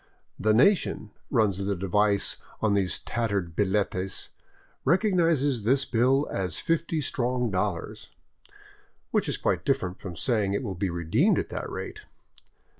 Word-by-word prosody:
" - - -44
The 110 - +5
nation," 135 - +3 0.2
runs 105 -6 +2
the 100 0 0
device 100 +2 +1 0.2
on 110 -2 +2
these 95 -3 +1
tattered 100 -8 -2
billetes 95 -1 -1 0.3
" - - -30 0.2
recognizes 165 - +2
this 130 +5 +3
bill 130 +4 +2
as 90 -4 -2
fifty 165 -1 0
strong 125 -3 -1
dollars," 95 -1 -3 1.0
which - - +1
is - - -1
quite - - 0
different 115 -10 -1
from 90 -3 -7
saying 105 -4 0
it 115 - -2
will 100 -5 -3
be 95 +1 -2
redeemed 85 - +2
at - - -2
that - - -5
rate. 430 - -6
110 Hz, 145 wpm, -27 LUFS, 95-135 Hz, 1.0 s, The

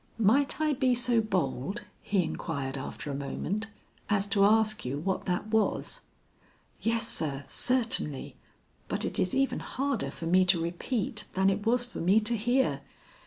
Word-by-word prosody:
"Might 240 +8 +3
I 310 -1 +2
be 255 -2 +2
so 240 -1 +2
bold," 185 - -2 0.2
he 195 -3 +1
inquired 140 -4 -4
after 140 +1 -5
a - - -3
moment, 190 +9 -3 0.4
"as 200 -2 +2
to 200 0 +3
ask 215 0 +3
you 125 +3 -3
what 190 +5 -2
that 180 +3 -2
was?" 220 -1 0 0.8
"Yes, 230 0 +2
sir, 140 -3 -2
certainly, 235 - +1 0.5
but - - -2
it - - +1
is 185 - +1
even 270 0 +1
harder 275 -3 -2
for 165 - -7
me 185 +3 +4
to 175 -1 +4
repeat 210 +7 -2
than 190 +1 +4
it 205 +3 -3
was 245 +1 +3
for 245 - -8
me 190 +6 +4
to 225 +3 0
hear. 240 +4 +1
210 Hz, 165 wpm, -29 LUFS, 170-240 Hz, 0.8 s, me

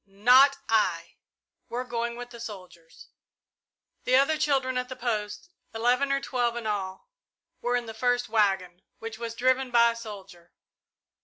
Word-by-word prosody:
Not 250 +8 +5
I! 210 -7 0 0.5
We're 245 +1 -3
going 235 -1 -3
with 245 0 -8
the 235 - -11
soldiers!" 185 -7 -11 0.9
The 255 - +2
other 280 +4 +4
children 270 -4 0
at 250 0 -2
the 255 - -6
post, 215 +5 -4 0.2
eleven 250 +5 +1
or 275 - +2
twelve 245 -3 -1
in 235 - -6
all, 205 - -4 0.5
were 245 0 0
in 245 -1 -1
the 225 - -7
first 245 +1 0
waggon, 195 -5 0 0.2
which 225 0 -8
was 230 -1 -5
driven 255 +2 +1
by 235 -1 +5
a - - -8
soldier. 200 -6 -11
235 Hz, 155 wpm, -27 LUFS, 210-250 Hz, 0.9 s, Not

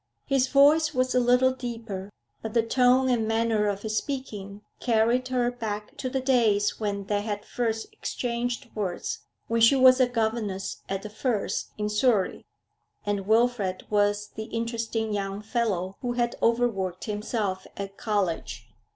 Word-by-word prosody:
His 270 -2 +2
voice 300 +3 +5
was 255 0 +1
a 250 - +4
little 250 +1 +4
deeper, 230 -6 -6 0.3
but 220 0 -6
the 230 - +4
tone 250 +2 +4
and 235 -4 +1
manner 225 -1 +1
of 200 0 -2
his 215 0 -1
speaking 210 -8 -5 0.2
carried 235 +2 +2
her 245 -1 +1
back 210 -3 -5
to 255 - -3
the 265 +1 -1
days 230 -6 +2
when 200 -2 -2
they 205 0 0
had 205 -1 -4
first 230 - -2
exchanged 240 - -3
words 215 - -3 0.3
when 230 0 0
she 230 +4 +7
was 260 0 +7
a 255 - +5
governess 220 -5 -2
at 195 0 -2
The 210 - -7
Firs 220 -1 -1
in 210 0 -1
Surrey, 210 -2 +1 0.6
and 200 -1 -2
Wilfrid 220 -4 +2
was 205 0 +2
the 220 - -7
interesting 230 -1 -2
young 200 0 -3
fellow 205 -5 -1
who 245 -1 -1
had 240 -1 0
overworked 225 -6 +1
himself 210 -2 -2
at 195 0 -5
college. 200 -6 -2
225 Hz, 155 wpm, -26 LUFS, 205-245 Hz, 0.6 s, she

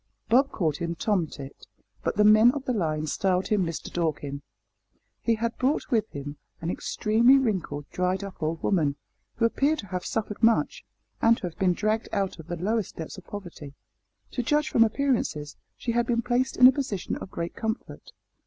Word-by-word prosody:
Bob 265 +5 +5
called 155 -6 0
him 170 -1 -3
Tomtit, 165 -8 -3 0.4
but - - -1
the 210 - +5
men 215 +2 +7
of 280 -2 -5
the 255 - 0
line 155 -7 -1
styled 185 +4 0
him 210 -3 +2
Mister 165 -2 -5
Dorkin. 150 -4 -2 0.8
He 230 - +2
had 230 +1 -2
brought 265 +4 0
with 220 -3 +2
him 145 +1 -7 0.2
an 165 +1 -2
extremely 230 +8 +3
wrinkled, 185 - -1
dried 185 +2 0
up 195 -3 -9
old 160 +1 -2
woman, 155 -8 +2 0.4
who 230 - +2
appeared 280 +6 +2
to 215 - -6
have 180 -1 -3
suffered 215 -1 -3
much, 230 - +2 0.4
and 230 0 +5
to - - -14
have 175 0 -5
been 185 -2 +3
dragged 215 +4 -1
out 195 -3 -1
of 160 - -10
the 175 - -3
lowest 210 +3 -1
depths 165 +4 -7
of 190 - -19
poverty. 170 -8 -8 0.6
To 250 - -1
judge 295 +5 +1
from 230 - +5
appearances 220 - -1 0.2
she 235 - -2
had 235 0 +1
been 235 -1 +1
placed 245 +2 0
in 250 - +8
a 255 - +11
position 250 -9 -3
of - - -8
great 170 -1 -4
comfort. 220 +1 -5
205 Hz, 190 wpm, -26 LUFS, 170-235 Hz, 0.8 s, a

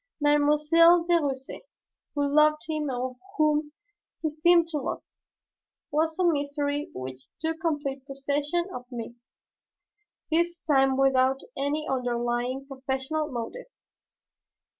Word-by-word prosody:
Mademoiselle 300 +4 +5
de 345 -1 +4
Russaie, 270 -2 -4 0.5
who 285 -1 +1
loved 305 +1 +4
him 305 -2 -2
and 255 0 -3 0.2
whom 300 -1 +2 0.5
he 315 - 0
seemed 340 +2 +4
to 310 -3 -2
love, - - -4 0.9
was 320 +2 0
a 370 - +1
mystery 290 -2 0
which 130 0 -7
took 320 0 -2
complete 290 -5 -2
possession 285 +4 -1
of 250 - -6
me, 235 -1 -6 1.2
this 340 +1 +1
time 270 -4 +3
without 270 0 +3
any 290 +3 -1
underlying 245 +1 -1
professional 270 +3 -3
motive. 250 - -5
290 Hz, 115 wpm, -27 LUFS, 265-315 Hz, 1.2 s, Mademoiselle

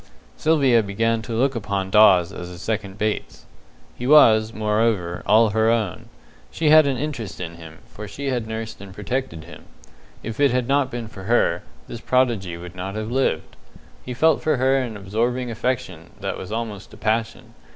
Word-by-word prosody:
Sylvia 140 -7 +3
began 110 +3 -1
to 115 +1 -6
look 135 +4 +2
upon 100 -4 -3
Dawes 95 -5 +5
as 90 0 -7
a 90 - -10
second 100 0 -4
Bates. 105 +1 -3 0.5
He 125 - -5
was, 110 -7 +6
moreover, 105 -5 0
all 110 +1 +5
her 110 +1 +2
own. 110 -6 -1 0.4
She 155 -2 +1
had 155 -1 +7
an 135 -2 0
interest 130 -7 -5
in 85 -2 -5
him, 80 -1 -12
for 105 0 -10
she 140 +8 -5
had 120 -3 -2
nursed 110 -1 -6
and 95 -1 -11
protected 105 -6 -4
him. 85 - -13 0.6
If 115 +2 -6
it 145 -1 +5
had 125 -1 0
not 140 -1 +2
been 120 -2 -5
for 95 -3 -11
her, 100 -6 +2 0.3
this 115 - -8
prodigy 115 -9 0
would 85 0 -10
not 95 +2 -5
have 110 +1 -4
lived. 125 -11 -1 0.5
He 125 - -6
felt 160 +4 +3
for 155 -3 +1
her 130 +2 +2
an 120 -5 -4
absorbing 120 +5 -2
affection 110 -9 -3
that - - -3
was 95 - -8
almost 110 -3 -5
a - - -16
passion. 110 +1 -2
110 Hz, 185 wpm, -22 LUFS, 100-125 Hz, 0.6 s, had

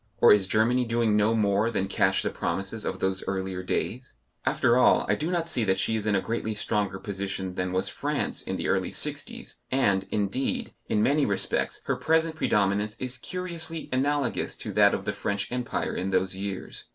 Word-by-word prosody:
Or - - +8
is 100 -2 +2
Germany 115 +5 +2
doing 115 -2 +1
no 105 +2 +3
more 105 0 +2
than 100 -4 -1
cash 95 -1 +2
the - - -1
promises 100 +3 -3
of 95 - -2
those 95 0 -1
earlier 95 -1 -2
days? 120 +7 -3 0.3
After 120 - +3
all, 125 - +5
I - - +3
do 155 +2 -2
not 170 -2 0
see 125 -8 +1
that 95 -1 +2
she 110 - +1
is 110 -1 -2
in 105 - +3
a 95 - +2
greatly 110 -1 -2
stronger 105 -2 -1
position 95 -1 -4
than 90 0 -2
was 95 0 0
France - - -2
in - - -4
the - - -3
early - - +1
sixties, - - -2
and, 100 -8 +2
indeed, 105 +5 -1 0.2
in 105 - +2
many 145 +4 +3
respects 100 -2 0
her - - 0
present 160 0 +1
predominance 105 -5 +1
is 130 -1 -3
curiously 170 -3 -4
analogous 140 +2 0
to - - -6
that - - +5
of - - -6
the - - -1
French 100 -1 -2
Empire 125 -1 -2
in 95 - -2
those 95 0 +1
years. 95 0 -6
105 Hz, 195 wpm, -27 LUFS, 95-125 Hz, 0.3 s, Or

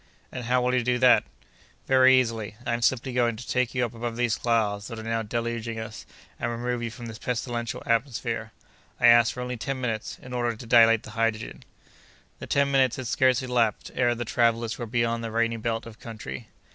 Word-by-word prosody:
"And 125 -2 -6
how 125 +1 +2
will 125 0 +1
you 125 - +3
do 125 +1 +1
that?" 125 -2 +5 0.6
"Very 130 0 +6
easily. 115 -4 -2
I 120 - 0
am 120 - -2
simply 130 +1 +1
going 120 -2 +2
to 115 +2 -10
take 125 0 0
you 125 -1 +2
up 120 - -7
above 115 0 -4
these 120 -1 +1
clouds 110 -3 0
that 115 - -7
are 110 - -7
now 115 0 -1
deluging 115 0 -3
us, 110 -1 -8 0.3
and 120 - -1
remove 120 +1 -2
you 115 - -2
from 120 +1 -9
this 115 -1 -8
pestilential 120 0 -3
atmosphere. 115 -2 -1 0.5
I - - +3
ask 120 -2 +7
for 125 - -6
only 125 0 -4
ten 135 +3 -3
minutes, 115 -4 -3
in 125 - -10
order 120 -1 -1
to 115 - -10
dilate 115 -1 +5
the 110 - -10
hydrogen." 115 0 -2 0.8
The - - -8
ten 140 0 +2
minutes 130 -3 +3
had 130 - -6
scarcely 130 +2 +2
elapsed 120 -4 0
ere 120 -2 +2
the 120 +1 -4
travellers 115 0 +1
were 120 - -4
beyond 115 0 0
the 115 - -3
rainy 115 +1 0
belt 115 0 -2
of 110 -1 -12
country. 110 - -8
120 Hz, 210 wpm, -26 LUFS, 115-125 Hz, 0.8 s, ask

